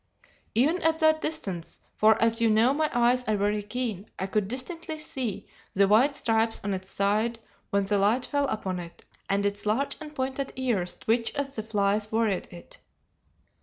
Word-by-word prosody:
Even 300 +10 +3
at 320 0 +3
that 315 -1 +4
distance, 190 - -4 0.2
for 220 0 +4
as 230 0 +2
you 230 - +4
know 225 +5 +4
my 310 +1 +1
eyes 245 +1 +3
are 215 -2 +1
very 205 +1 0
keen, 215 -2 -4
I 190 - -2
could 200 0 0
distinctly 315 - -3
see 260 -8 -4 0.3
the 200 0 +4
white 245 +8 +4
stripes 225 -2 +1
on 200 0 -1
its 190 0 -5
side 215 +4 +1 0.3
when 200 0 +1
the 200 0 +1
light 220 +6 +2
fell 285 -1 0
upon 195 -7 -3
it, 170 -1 -10 0.2
and 200 +1 +1
its 205 0 -2
large 265 +7 0
and 300 -1 -9
pointed 265 +1 -3
ears 230 -9 -1
twitch 230 +3 0
as 280 -1 -3
the 220 - -2
flies 210 -1 0
worried 220 -4 0
it. 175 -1 -13
225 Hz, 180 wpm, -27 LUFS, 200-265 Hz, 0.3 s, that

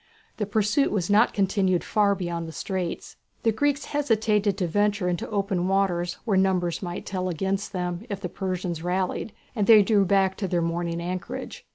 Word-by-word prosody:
The 210 - -2
pursuit 215 +7 +2
was 195 -2 -1
not 215 +3 +5
continued 190 -2 +1
far 205 -2 +2
beyond 170 -3 -3
the - - -7
straits. 185 0 -4 0.3
The 225 - +4
Greeks 285 +5 0
hesitated 220 -8 +1
to 190 - 0
venture 205 +2 +1
into 175 -2 -2
open 195 -4 0
waters 180 -3 0
where 205 -5 +2
numbers 185 -3 +1
might 175 -2 -5
tell 185 -1 -2
against 190 +4 -2
them 180 +3 -3
if 200 -2 -3
the 185 - -4
Persians 180 -2 -3
rallied, 185 +4 -1 0.2
and 205 -3 0
they 215 -2 +8
drew 205 0 +3
back 190 0 +2
to 195 - -2
their 175 -1 0
morning 170 0 -1
anchorage. 185 - -5
190 Hz, 180 wpm, -25 LUFS, 180-210 Hz, 0.3 s, they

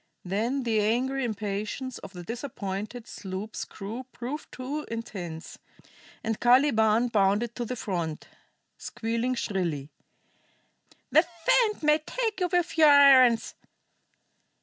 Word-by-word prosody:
Then 230 +9 -1
the 225 -2 +1
angry 255 +5 0
impatience 215 +3 -4
of 195 - -11
the 175 -1 -8
disappointed 225 -1 -5
sloop's 195 +3 -6
crew 225 +6 -7
proved 260 +6 -6
too 280 +4 -4
intense, 185 -8 -6 0.6
and 225 -1 -2
Caliban 240 -2 +4
bounded 210 +2 +2
to 240 - -4
the 250 - -4
front, 170 -8 -4 0.5
squealing 230 +2 -2
shrilly: 170 - -2 1.2
"The 315 - +7 0.2
fiend 430 -7 +3
may 300 +1 +4
take 445 +7 -3
you 360 -1 0
with 350 -2 0
your 310 -1 +8
irons! 265 -5 +6
230 Hz, 115 wpm, -27 LUFS, 205-265 Hz, 1.2 s, your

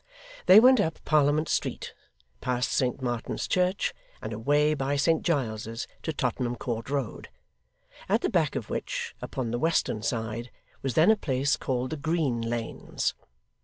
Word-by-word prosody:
They 190 +3 +10
went 255 +1 +7
up 160 -5 0
Parliament 150 +1 +3
Street, - - -2 0.5
past 125 0 0
Saint 130 0 0
Martin's 120 -2 -2
church, 185 +2 +1 0.3
and 110 - -5
away 145 +7 +2
by 140 -1 -1
Saint 160 +3 +2
Giles's 115 -7 -2
to 160 - -2
Tottenham 125 -3 -1
Court 115 0 -4
Road, 140 -5 -3 0.8
at - - +3
the - - 0
back - - +1
of - - -3
which, - - -3
upon 125 -4 -3
the 120 - -1
western 160 -8 +1
side, 115 +1 -3 0.3
was 135 -4 -2
then 165 +7 +6
a - - +5
place 140 -6 0
called 130 -1 -2
the 160 - -3
Green 145 -5 0
Lanes. 115 0 -2
135 Hz, 155 wpm, -27 LUFS, 120-155 Hz, 0.8 s, They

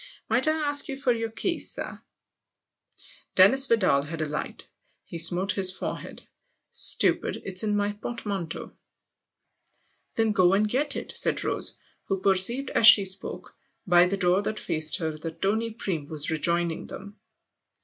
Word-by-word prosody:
" - - -35
Might 260 +3 +2
I 310 - +3
ask 290 -2 +2
you 275 -2 -5
for 270 -2 0
your 225 -1 -4
keys, 335 +10 -2
sir? - - -6 0.6
" - - -23
Dennis 260 +9 +6
Vidal 185 - +2
had 160 +3 -7
a - - -2
light 150 0 -6 0.4
he 170 - -7
smote 180 +4 +2
his 190 -2 +1
forehead. 185 - -7 0.3
" - - -46 0.2
Stupid - - +1
it's 185 -1 -5
in 210 -1 -1
my 205 0 0
portmanteau! 205 -5 -6 0.5
" - - -47
" - - -39
Then 225 -1 +1
go 185 -2 +3
and 210 +2 +2
get 280 +6 -2
it! - - -4
" - - -7
said - - +1
Rose, - - -1 0.3
who 195 - -2
perceived 195 +8 +2
as 220 - +5
she 200 -4 +9
spoke, 190 +1 -4 0.3
by 175 -1 +5
the 195 +2 -2
door 180 +1 +2
that 215 +1 -4
faced 155 -1 0
her, 160 -2 -3
that 160 +2 -8
Tony 220 +5 -1
Bream 185 -9 -5
was 155 0 -3
rejoining 170 +1 -1
them. 205 +2 -10
195 Hz, 175 wpm, -25 LUFS, 175-225 Hz, 0.6 s, she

